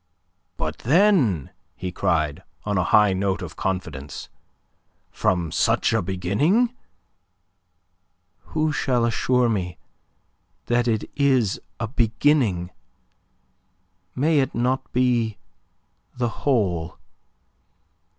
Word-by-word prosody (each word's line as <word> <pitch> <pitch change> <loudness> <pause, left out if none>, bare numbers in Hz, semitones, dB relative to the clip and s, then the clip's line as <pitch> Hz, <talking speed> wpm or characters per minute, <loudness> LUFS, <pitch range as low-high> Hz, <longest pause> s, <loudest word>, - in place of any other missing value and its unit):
"But, 80 0 -3
then," 140 - +3 0.2
he 90 -1 -5
cried, 80 -6 0 0.2
on 105 -1 -1
a 90 - +1
high 105 +3 +5
note 95 0 -1
of 80 -3 -8
confidence, 80 -7 -4 0.8
"from 85 -3 0
such - - +2
a - - +2
beginning..." 105 - +1 1.8
"Who 155 0 +2
shall 125 -5 +1
assure 125 +2 +2
me 95 -6 -2 0.9
that 120 0 +1
it 110 -2 0
is 130 -8 +2 0.2
a 115 - -2
beginning? 115 - +1 1.4
May 150 +3 +3
it 135 - -1
not 130 +2 -1
be 120 -4 +1 0.8
the 120 -1 0
whole? 95 - -1
110 Hz, 95 wpm, -23 LUFS, 90-130 Hz, 1.8 s, high